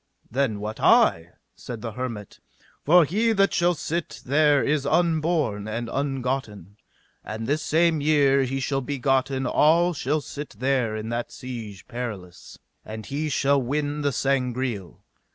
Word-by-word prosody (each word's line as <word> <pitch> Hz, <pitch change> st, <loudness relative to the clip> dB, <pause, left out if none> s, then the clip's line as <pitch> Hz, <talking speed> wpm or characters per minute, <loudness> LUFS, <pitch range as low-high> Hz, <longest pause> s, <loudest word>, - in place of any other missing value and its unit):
Then 120 Hz, -4 st, 0 dB
wot 110 Hz, +1 st, -5 dB
I, 85 Hz, +1 st, +4 dB, 0.2 s
said 120 Hz, -3 st, -8 dB
the 115 Hz, -, -4 dB
hermit, 115 Hz, -3 st, -6 dB, 0.4 s
for 170 Hz, +2 st, +6 dB
he 220 Hz, +8 st, +1 dB
that 195 Hz, -1 st, +2 dB
shall 175 Hz, 0 st, +2 dB
sit 165 Hz, +2 st, -4 dB
there 145 Hz, +1 st, +3 dB
is 150 Hz, -1 st, +1 dB
unborn 155 Hz, -9 st, +1 dB
and 115 Hz, +2 st, -4 dB
ungotten, 130 Hz, -, -3 dB, 0.5 s
and 110 Hz, +1 st, -5 dB
this 145 Hz, +6 st, 0 dB
same 165 Hz, 0 st, +2 dB
year 140 Hz, -2 st, +3 dB
he 135 Hz, +1 st, -1 dB
shall 135 Hz, +1 st, -1 dB
be 140 Hz, +2 st, -4 dB
gotten 135 Hz, +1 st, +1 dB
that 165 Hz, +7 st, +3 dB
shall 150 Hz, +3 st, -1 dB
sit 145 Hz, +1 st, -8 dB
there 130 Hz, -4 st, 0 dB
in 110 Hz, +1 st, -5 dB
that 120 Hz, 0 st, -3 dB
Siege 115 Hz, -6 st, -8 dB
Perilous, 110 Hz, -8 st, -7 dB, 0.3 s
and 110 Hz, 0 st, -8 dB
he 150 Hz, +5 st, -3 dB
shall 140 Hz, 0 st, +2 dB
win 145 Hz, +3 st, -2 dB
the 145 Hz, -1 st, +1 dB
Sangreal. 125 Hz, -7 st, -2 dB
135 Hz, 150 wpm, -24 LUFS, 115-150 Hz, 0.5 s, for